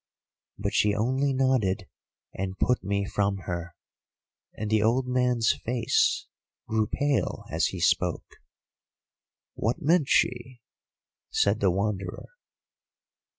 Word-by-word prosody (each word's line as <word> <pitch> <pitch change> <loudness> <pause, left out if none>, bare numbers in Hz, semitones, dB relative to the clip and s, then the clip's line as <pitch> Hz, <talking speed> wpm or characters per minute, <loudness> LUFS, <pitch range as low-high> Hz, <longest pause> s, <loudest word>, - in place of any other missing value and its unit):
"But - - -3
she 105 -1 +3
only 130 +6 +1
nodded, 125 -8 +1 0.5
and 95 0 -4
put 125 - +1
me 100 +1 -1
from 100 0 0
her,"—and 85 +4 -9
the 110 -1 +3
old 120 +4 +2
man's 125 -3 +2
face 120 -1 +1 0.4
grew 110 -1 +1
pale 140 -4 -1
as - - +2
he - - -5
spoke. - - 0 1.2
"What 115 +3 -1
meant 160 -1 +3
she?" 120 0 +1 0.7
said 100 +2 +2
the 100 - +3
Wanderer. 95 0 -2
110 Hz, 110 wpm, -27 LUFS, 100-125 Hz, 1.2 s, she